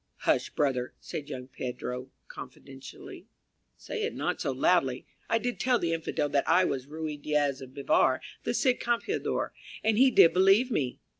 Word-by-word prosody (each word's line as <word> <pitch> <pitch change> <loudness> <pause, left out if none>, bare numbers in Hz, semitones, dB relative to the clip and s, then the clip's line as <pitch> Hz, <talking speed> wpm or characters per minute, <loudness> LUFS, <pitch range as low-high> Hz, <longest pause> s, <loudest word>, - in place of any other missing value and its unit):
"Hush, - - +1
brother," 130 -4 -1
said 145 -1 -7
young 125 -3 -6
Pedro, 125 -1 -5 0.2
confidentially, - - -11 0.5
"say 460 - -5
it 445 +2 -2
not - - -2
so - - 0
loudly. - - +1 0.2
I 225 - +3
did 245 +1 -3
tell 250 -1 +3
the 170 -6 -1
Infidel 160 -2 -1
that 140 -1 0
I 185 0 +5
was 130 -4 -3
Ruy 155 0 -5
Diaz 145 -3 0
of 130 0 -11
Bivar, 140 -1 +2 0.2
the - - -1
Cid 255 -3 +2
Campeador 240 - -1 0.3
and 220 0 +2
he 265 +1 +7
did 170 -9 +6
believe 195 +7 +4
me." 130 - -1
155 Hz, 165 wpm, -28 LUFS, -, 0.5 s, he